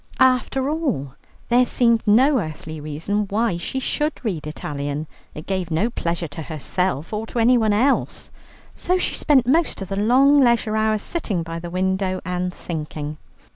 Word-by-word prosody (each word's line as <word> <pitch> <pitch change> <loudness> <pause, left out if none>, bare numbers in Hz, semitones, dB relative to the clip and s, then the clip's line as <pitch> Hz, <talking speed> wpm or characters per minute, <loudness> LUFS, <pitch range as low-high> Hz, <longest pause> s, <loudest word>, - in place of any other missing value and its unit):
After 260 +1 +3
all, 280 - -2 0.4
there 245 +1 +5
seemed 235 -2 +3
no 260 +6 +5
earthly 155 -3 -6
reason 160 +8 -2
why 205 -2 0
she 220 +9 -3
should 300 +4 -1
read 170 -8 -2
Italian; 145 0 -4 0.3
it 155 - -8
gave 185 -3 -2
no 190 +9 0
pleasure 170 -4 -2
to 155 - -7
herself 160 +2 -2
or 215 +1 -3
to - - -7
anyone 230 -2 +4
else. 250 +7 +1 0.4
So 365 +1 0
she 365 - -1
spent 275 -5 +3
most 315 +6 +2
of 195 -2 -6
the 195 0 -2
long 270 +7 +5
leisure 235 -4 +3
hours 215 -1 +1
sitting 210 - -2
by 165 0 -5
the 175 0 -7
window 185 +1 -1
and 180 0 -2
thinking. 155 -3 -6
205 Hz, 165 wpm, -22 LUFS, 165-245 Hz, 0.4 s, there